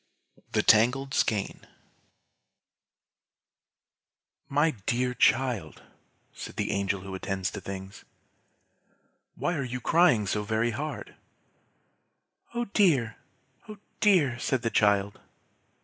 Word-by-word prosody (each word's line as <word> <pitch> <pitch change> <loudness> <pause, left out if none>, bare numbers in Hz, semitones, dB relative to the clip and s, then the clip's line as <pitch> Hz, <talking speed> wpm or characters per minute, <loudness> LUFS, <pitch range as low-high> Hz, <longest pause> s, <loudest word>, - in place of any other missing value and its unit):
'" - - -31
THE - - +2
TANGLED 125 +5 +4
SKEIN 105 -3 -1 2.8
"My 145 +3 +2 0.2
dear 125 +1 +1
child," 120 -10 +1 0.5
said - - -9
the - - -2
Angel 100 -1 -1
who 95 0 -8
attends 95 -1 -3
to 100 - -7
things, 95 0 -8 1.3
"why 175 - -1
are 140 -5 -2
you 125 0 -4
crying 160 -7 +3
so 105 +2 -1
very 110 +3 0
hard?" 150 +7 -5 1.4
"Oh 240 0 -1
dear! 155 - +2 0.5
oh 210 - -8 0.2
dear!" 155 - +3
said 130 0 -1
the 115 - 0
child. 100 -1 +2
120 Hz, 105 wpm, -27 LUFS, 100-140 Hz, 2.8 s, TANGLED